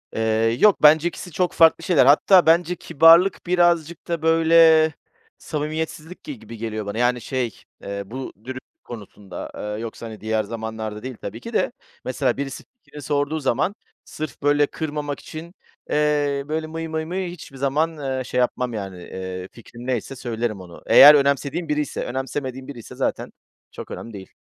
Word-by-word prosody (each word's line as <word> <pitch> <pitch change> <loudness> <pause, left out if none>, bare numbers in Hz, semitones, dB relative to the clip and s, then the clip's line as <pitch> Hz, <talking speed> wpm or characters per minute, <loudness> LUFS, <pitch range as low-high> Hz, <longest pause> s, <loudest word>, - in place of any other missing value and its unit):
Eee, 110 +1 +1
yok 210 -6 +4
bence 155 +2 +7
2'si 180 +1 -7
çok 180 +3 -1
farklı 165 -1 +5
şeyler. 165 -9 +4
Hatta 175 +6 +6
bence 170 +2 +3
kibarlık 165 +4 +4
birazcık 175 -2 +1
da, 170 -2 -2
böyle, 160 -1 +5 0.4
samimiyetsizlik 155 +2 -5
gi 290 -6 -8
gibi 115 - -11
geliyor 110 -1 -4
bana. 100 +2 -5
Yani, 125 0 +1
şey, 125 -3 -3 0.3
eee, 100 0 -5
bu 130 +6 -7
dürüstlük 130 +1 -10
konusunda, 105 -4 -9
aaa, 105 0 -5
yoksa, 115 +1 -7
hani, 110 -1 -9
diğer 110 0 0
zamanlarda 110 0 -6
değil, 130 -3 -6
tabii 110 +3 -6
ki - - -9
de. - - +1 0.3
Mesela - - -1
birisi 135 -1 -5 0.2
fikrimi 150 - -11
sorduğu 145 +2 -1
zaman, 150 - 0 0.3
sırf 155 0 -7
böyle 145 0 +3
kırmamak 150 -2 -4
için, 165 +2 -10 0.4
eee, 145 -2 +1
böyle, 155 +1 -2
mıy, 165 +1 -5
mıy, 160 0 -3
mıy 180 +1 -3
hiçbir 150 -5 -11
zaman, 140 +4 +1
ııı, 130 -3 -3
şey 125 - -2
yapmam, 125 0 0
yani, 95 -4 -6
eee, 95 0 -6
fikrim 120 +1 -12
neyse 130 +1 -2
söylerim 115 -4 -3
onu. 85 -2 -13
Eğer 150 +1 +9
önemsediğim 140 +4 0
biriyse, 150 -1 -2
önemsemediğin 130 0 -4
biriyse 120 -6 -10
zaten - - -2 0.4
çok - - -9
önemli 115 - -8
değil. 95 -2 -10
140 Hz, 165 wpm, -22 LUFS, 115-160 Hz, 0.4 s, Eğer